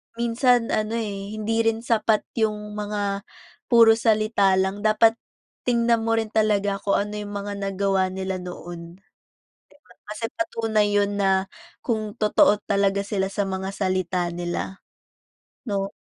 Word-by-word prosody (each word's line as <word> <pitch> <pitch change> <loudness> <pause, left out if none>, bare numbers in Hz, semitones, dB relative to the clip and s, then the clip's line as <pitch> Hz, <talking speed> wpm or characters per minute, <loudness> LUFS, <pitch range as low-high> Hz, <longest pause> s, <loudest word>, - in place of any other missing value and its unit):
minsan 235 0 +2
ano, 215 +1 0
eh, 205 -2 -4
hindi 225 +1 -1
rin 225 +1 0
sapat 220 -2 +2 0.2
yung 210 -1 -1
mga 205 -1 -3 0.4
puro 230 -2 +7
salita 215 -3 +3
lang. 190 +1 0
Dapat 225 +2 +3 0.5
tingnan 235 -1 +2
mo 225 0 +1
rin 220 -1 -2
talaga 205 -2 +1
kung 200 0 +1
ano 205 +1 -2
yung 205 - -7
mga 205 0 -5
nagawa 195 -1 0
nila 190 0 -4
noon. 175 -1 -9
'Di 195 - -32 0.8
ba? 180 - -19 0.2
Kasi 225 +2 -3
patunay 225 -10 0
yun 205 0 +1
na 195 -1 +2 0.3
kung 215 -3 -2
totoo 210 -1 +4
talaga 200 -1 +2
sila 195 -1 -1
sa 200 -1 -1
mga 190 0 -3
salita 185 -2 -1
nila, 175 +2 -4 0.9
'no? 195 -2 -2
205 Hz, 140 wpm, -24 LUFS, 195-220 Hz, 0.9 s, puro